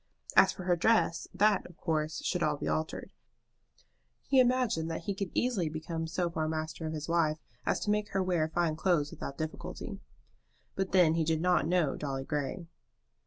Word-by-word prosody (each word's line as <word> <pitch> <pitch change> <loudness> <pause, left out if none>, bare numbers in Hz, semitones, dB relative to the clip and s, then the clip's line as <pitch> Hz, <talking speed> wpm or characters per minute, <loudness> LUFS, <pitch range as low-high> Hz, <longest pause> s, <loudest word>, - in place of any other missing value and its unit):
As - - +7
for 185 - -8
her 180 -1 +3
dress, 175 -2 +2
that, 210 0 +3
of 175 - -17
course, 155 -1 -1
should 180 - 0
all 150 -2 +1
be - - -4
altered. 155 0 -2 1.1
He 270 -1 +4
imagined 245 -10 +2
that 165 - -3
he 200 - -1
could 195 -1 -3
easily 220 -10 +1
become 160 +1 -4
so 175 +2 -1
far 160 -2 -2
master 160 0 -3
of 155 - -3
his 155 -1 -4
wife 165 -2 +2 0.3
as - - +2
to 210 - 0
make 210 0 0
her 190 -1 0
wear 175 -4 +1
fine 165 -1 0
clothes 155 -3 +1
without 140 - -7
difficulty. 155 0 -5 0.7
But 190 -1 -2
then 175 -4 +5
he 165 0 +1
did 160 0 +1
not 180 -1 +2
know 170 -5 +2
Dolly 135 -2 -3
Grey. 150 +5 -3
165 Hz, 185 wpm, -31 LUFS, 155-185 Hz, 1.1 s, As